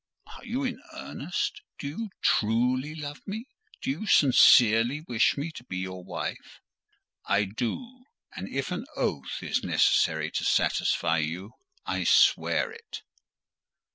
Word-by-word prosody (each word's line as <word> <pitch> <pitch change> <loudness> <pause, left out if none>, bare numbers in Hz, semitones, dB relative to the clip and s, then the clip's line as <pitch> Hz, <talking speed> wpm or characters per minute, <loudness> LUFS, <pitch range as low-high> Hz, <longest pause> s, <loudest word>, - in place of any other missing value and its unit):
"Are - - -13
you 255 +3 -3
in 255 -2 -3
earnest? 425 - -4 0.2
Do 140 - -5
you 210 +10 -5
truly 125 +7 +1
love 145 -1 -6
me? 220 +4 -5 0.4
Do - - 0
you 175 +10 -5
sincerely 125 - +6
wish 120 -5 +1
me 150 +4 -3
to 155 - -11
be 95 -6 -6
your 95 0 -5
wife?" - - -6 0.7
"I 100 +1 +3
do; 235 - -5 0.3
and 95 - -6
if 135 0 -3
an - - -3
oath 65 -1 -3
is - - -1
necessary - - +2
to - - -2
satisfy 80 +1 +2
you, 85 +7 -4 0.3
I - - -2
swear 470 - +4
it." 455 0 -10
130 Hz, 140 wpm, -27 LUFS, -, 0.7 s, sincerely